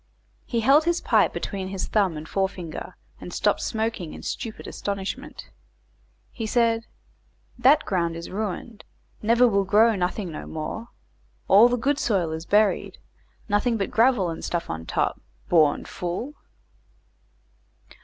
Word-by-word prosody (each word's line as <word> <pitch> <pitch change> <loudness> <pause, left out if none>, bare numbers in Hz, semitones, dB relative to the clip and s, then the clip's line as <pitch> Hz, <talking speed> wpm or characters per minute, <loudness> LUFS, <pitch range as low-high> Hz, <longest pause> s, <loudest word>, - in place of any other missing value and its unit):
He 235 -2 0
held 280 +7 +5
his 345 0 +1
pipe - - +3
between 195 -2 -4
his 190 0 -3
thumb 195 -7 +1
and 155 +1 -8
forefinger, 185 -3 -3 0.2
and - - -8
stopped - - +1
smoking 220 -7 -3
in - - -10
stupid 225 -4 -5
astonishment. 200 -1 -5 0.8
He 225 -2 -5
said 230 0 +1 0.7
"That 275 +5 +5
ground 170 -3 0
is 165 0 -7
ruined, 215 +2 -4 0.4
never 235 +3 +4
will 200 -3 +2
grow 215 +4 +4
nothing 180 0 -2
no 150 - -7
more; 160 +9 -5 0.6
all 210 +5 +7
the 245 - +1
good 280 +5 0
soil 185 -8 +1
is 160 +1 -6
buried; 210 0 +2 0.5
nothing 225 +3 +1
but 195 - -2
gravel 225 -6 +3
and 165 - -7
stuff 170 -1 -2
on 80 0 -6
top; - - -1 0.3
born 155 -4 +3
fool." 180 +11 -4
205 Hz, 140 wpm, -25 LUFS, 180-230 Hz, 0.8 s, all